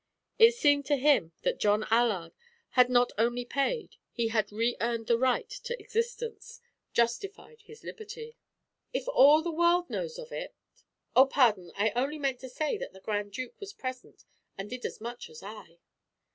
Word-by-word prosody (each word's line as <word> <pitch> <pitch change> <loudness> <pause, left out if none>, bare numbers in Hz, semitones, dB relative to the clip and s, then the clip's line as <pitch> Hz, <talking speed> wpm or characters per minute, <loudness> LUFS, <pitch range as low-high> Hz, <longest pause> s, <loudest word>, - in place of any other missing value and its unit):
It 460 +1 +8
seemed 285 - +3
to 290 - +3
him 270 - +3
that - - 0
John 210 +1 +2
Allard 220 -8 +2 0.4
had 250 -1 +4
not 245 0 +3
only 240 +2 +1
paid; 280 - -2
he 235 -1 -1
had 215 -2 0
re 230 +3 0
earned 230 -1 -1
the 235 - +3
right 255 -1 +1
to - - -6
existence, 470 +1 -4 0.3
justified 395 - -2
his 445 +1 -15
liberty. 455 +1 -9 0.6
"If - - -3
all 300 - +6
the 340 - -2
world 345 +2 +2
knows 480 -1 -4
of - - -9
it - - -6 0.3
" - - -49
"Oh, 265 +1 +8
pardon; 215 -11 +2
I 210 +1 +1
only 275 +5 0
meant 270 -4 -1
to 260 - -9
say 310 - -2
that - - -6
the 190 - -13
Grand 205 0 -3
Duke 255 +2 -6
was 405 0 -8
present 255 -7 -8 0.3
and 195 +3 -6
did 250 0 -6
as - - -10
much 235 +2 -7
as 155 0 -12
I." 200 -5 -10
255 Hz, 180 wpm, -29 LUFS, -, 0.6 s, It